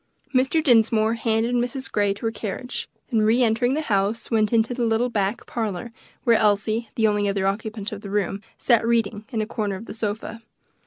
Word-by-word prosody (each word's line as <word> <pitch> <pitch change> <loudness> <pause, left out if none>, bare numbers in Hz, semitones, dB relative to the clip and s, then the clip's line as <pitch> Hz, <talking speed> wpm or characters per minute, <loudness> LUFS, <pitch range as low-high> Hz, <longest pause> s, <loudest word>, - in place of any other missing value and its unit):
Mr. 265 +5 +2
Dinsmore 225 -4 +4
handed 230 +1 0
Mrs. 245 +2 -2
Grey 205 -1 +2
to 215 - -7
her 225 - +1
carriage, 225 +4 -5 0.2
and 220 -3 +3
re 230 +4 +4
entering 240 +3 +2
the 310 - 0
house 210 -3 0
went 215 -2 +2
into 230 +1 +2
the 245 -1 -2
little 230 +2 +2
back 205 -1 -1
parlor 220 -1 -3 0.3
where 230 -2 +5
Elsie, 215 +2 +1
the 225 - +2
only 205 -1 +1
other 195 -1 0
occupant 210 +1 -2
of 205 -1 -6
the 200 - -8
room, 200 -1 -1 0.2
sat 235 -3 +3
reading, 225 -2 0
in 230 - -3
the 215 - +1
corner 210 -3 -2
of 200 +4 -8
the - - -8
sofa. 220 +1 -4
220 Hz, 200 wpm, -24 LUFS, 205-235 Hz, 0.3 s, where